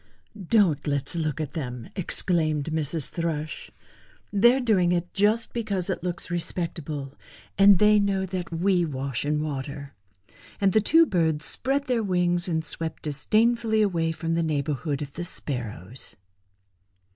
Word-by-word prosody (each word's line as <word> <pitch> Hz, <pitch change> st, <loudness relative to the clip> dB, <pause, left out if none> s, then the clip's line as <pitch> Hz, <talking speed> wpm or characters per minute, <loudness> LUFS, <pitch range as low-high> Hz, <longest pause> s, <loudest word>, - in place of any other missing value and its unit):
"Don't 180 Hz, -11 st, +3 dB
let's 140 Hz, +2 st, -1 dB
look 155 Hz, -2 st, -2 dB
at 150 Hz, -3 st, -4 dB
them," 125 Hz, -7 st, -5 dB
exclaimed 160 Hz, -5 st, 0 dB
Mrs. 155 Hz, -1 st, -2 dB
Thrush. 160 Hz, -3 st, -3 dB, 0.6 s
"They 235 Hz, +5 st, +6 dB
are -, -, 0 dB
doing 200 Hz, -8 st, +2 dB
it 175 Hz, 0 st, -2 dB
just 210 Hz, +3 st, +1 dB
because 200 Hz, -5 st, -2 dB
it 180 Hz, -, -4 dB
looks 175 Hz, -1 st, -4 dB
respectable, 160 Hz, -5 st, -3 dB, 0.4 s
and 195 Hz, +1 st, +7 dB
they 210 Hz, +2 st, +5 dB
know 195 Hz, -1 st, +1 dB
that 185 Hz, -2 st, -5 dB
we 175 Hz, +2 st, +2 dB
wash 135 Hz, -4 st, -3 dB
in 150 Hz, +1 st, 0 dB
water;" 140 Hz, -1 st, -5 dB, 0.7 s
and 195 Hz, -2 st, +2 dB
the 215 Hz, -, +4 dB
two 325 Hz, +10 st, +5 dB
birds 160 Hz, -, +1 dB
spread 275 Hz, +2 st, 0 dB
their 245 Hz, -4 st, +1 dB
wings 180 Hz, -2 st, +1 dB
and 160 Hz, -2 st, -1 dB
swept 160 Hz, -1 st, -3 dB
disdainfully 220 Hz, -, +2 dB
away 165 Hz, -5 st, 0 dB
from 165 Hz, 0 st, -3 dB
the 165 Hz, -, +1 dB
neighborhood 150 Hz, -1 st, -1 dB
of 140 Hz, -1 st, -9 dB
the 175 Hz, -, -5 dB
Sparrows. 125 Hz, -, -4 dB
170 Hz, 145 wpm, -26 LUFS, 150-195 Hz, 0.7 s, and